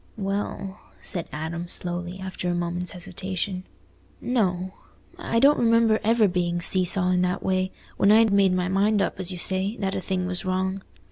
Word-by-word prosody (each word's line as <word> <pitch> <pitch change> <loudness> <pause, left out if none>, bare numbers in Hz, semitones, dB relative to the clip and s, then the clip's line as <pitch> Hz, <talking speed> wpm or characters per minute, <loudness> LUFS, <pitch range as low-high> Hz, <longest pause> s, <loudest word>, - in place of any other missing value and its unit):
"Well," 195 -1 -4 0.2
said 175 -5 -4
Adam, 165 +3 -5
slowly, 175 +1 -3
after 190 -1 -4
a 175 - 0
moment's 175 +1 -3
hesitation, 185 +1 -5 0.5
"no. 190 -7 -1 0.5
I 230 - 0
don't 280 +4 +5
remember 230 -1 +3
ever 225 0 +3
being 175 -1 -1
see 185 +2 +5
saw 180 +1 +4
in 180 0 +2
that 180 +1 -1
way, 185 0 0 0.3
when 200 - +4
I'd 220 -1 +5
made 195 -2 +4
my 180 0 0
mind 200 +3 +2
up, 195 - -1
as 185 0 0
you 180 - -5
say, 190 +5 0
that 195 -1 -2
a - - -3
thing 185 -1 -2
was 180 -1 0
wrong. 190 +1 -2
185 Hz, 180 wpm, -24 LUFS, 180-200 Hz, 0.5 s, don't